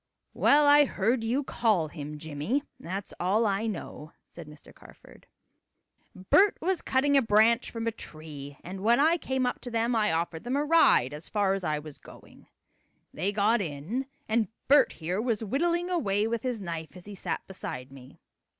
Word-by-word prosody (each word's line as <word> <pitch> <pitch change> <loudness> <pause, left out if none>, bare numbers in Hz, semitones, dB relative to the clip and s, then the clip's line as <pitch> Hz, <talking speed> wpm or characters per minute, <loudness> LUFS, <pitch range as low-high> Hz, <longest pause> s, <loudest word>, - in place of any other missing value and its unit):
"Well, 295 +1 +4
I 290 0 +7
heard 230 0 0
you 250 +6 0
call 215 - +1
him 150 -1 -7
Jimmie 160 - -2 0.2
that's 190 +3 -6
all 200 +6 +2
I 205 +2 0
know," 165 -6 -7
said 170 -3 -11
Mr. 150 0 -15
Carford. - - -18 0.9
"Bert 375 - +3
was 365 +1 -1
cutting 280 +2 +1
a 275 - +6
branch 225 +1 +3
from 230 -1 -5
a 230 - 0
tree, 150 -8 -10
and 190 +2 -7
when 235 +4 +3
I 320 +4 +4
came 265 -5 -1
up 245 - -2
to 245 - -7
them 230 +1 0
I 215 -1 +2
offered 165 0 -2
them 245 +2 -2
a 290 +1 0
ride 295 - +4
as 150 +2 -9
far 200 -2 +1
as 195 -1 -3
I 155 -3 0
was 150 -1 -10
going. - - -16 0.7
They 185 +6 -1
got 210 +2 +2
in, 180 - -4 0.2
and 220 -1 +1 0.2
Bert 285 +2 +5
here 180 +5 -3
was 230 -2 -1
whittling 340 - 0
away 210 - +1
with 230 -1 -2
his 250 -3 -3
knife 165 -1 -6
as 180 - -13
he 205 - -9
sat 195 - -4
beside 130 -8 -7
me. 130 -1 -14
210 Hz, 185 wpm, -28 LUFS, 165-250 Hz, 0.9 s, I